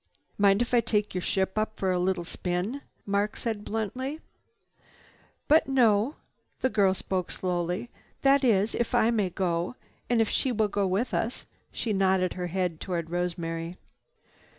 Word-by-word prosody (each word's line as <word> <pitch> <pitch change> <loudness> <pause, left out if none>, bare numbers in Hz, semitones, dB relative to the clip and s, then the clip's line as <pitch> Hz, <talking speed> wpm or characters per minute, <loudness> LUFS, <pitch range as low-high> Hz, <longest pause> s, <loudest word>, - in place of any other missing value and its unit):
"Mind 200 +2 +5
if 240 - -8
I 240 - +6
take 210 -2 0
your 180 - -1
ship 190 +3 0
up 215 0 -2
for 190 -1 +1
a 180 - +1
little 180 -1 0
spin?" 180 +9 -3 0.2
Mark 205 +1 0
said 220 -3 -3
bluntly. 255 +8 -3 1.3
"But 310 +2 +5
no." 240 -1 +3 0.5
The 260 - +2
girl 195 -3 +3
spoke 185 -2 -2
slowly. 180 +5 -2 0.3
"That 275 0 +5
is, 215 -3 +3
if 235 - -1
I 225 - +4
may 210 -5 +1
go, 175 +3 -1 0.3
and 240 -1 +3
if 225 - +3
she 260 - 0
will 215 -3 +1
go 200 -1 0
with 200 +7 0
us." 230 +3 -2 0.3
She 220 - -2
nodded 190 -2 +2
her 180 -1 -3
head 180 -2 -1
toward 170 -3 -3
Rosemary. 170 -1 -3
200 Hz, 160 wpm, -28 LUFS, 180-230 Hz, 1.3 s, I